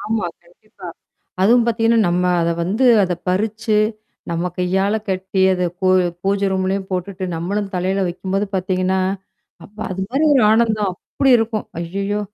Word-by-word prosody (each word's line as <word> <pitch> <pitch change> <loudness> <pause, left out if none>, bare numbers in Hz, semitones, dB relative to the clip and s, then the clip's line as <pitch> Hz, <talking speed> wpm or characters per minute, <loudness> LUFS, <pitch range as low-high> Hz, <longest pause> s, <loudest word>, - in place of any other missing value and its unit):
ஆமா. 215 -4 -2 0.2
கண்டிப்பா. 180 +1 -14 0.5
அதுவும் 235 +4 +5
பாத்தீங்கன்னா, 230 0 +2
நம்ம 175 +1 +1 0.2
அத 170 0 +1
வந்து 215 +9 +1 0.2
அத 180 -1 -1
பறிச்சு, 215 +3 0 0.5
நம்ம 170 +2 -1
கையால 190 +3 +1
கட்டி, 190 0 -1
அத 180 -1 -1 0.2
பூ 190 - 0 0.4
பூஜை 200 0 +1
ரூம்லயும் 190 +1 -1
போட்டுட்டு, 185 +1 -3
நம்மளும் 195 +4 -3
தலையில 190 +2 0
வைக்கும்போது 190 +3 -2
பாத்தீங்கன்னா, 185 0 0 0.6
அப்பா! 210 +2 -9
அது 190 +1 -4
மாரி 275 +5 +1
ஒரு 260 - +4
ஆனந்தம். 215 -4 +1 0.2
அப்படி 275 - +3
இருக்கும். 225 -1 -2
ஐய்யய்யோ! 195 +4 -2
195 Hz, 140 wpm, -19 LUFS, 185-215 Hz, 0.6 s, அதுவும்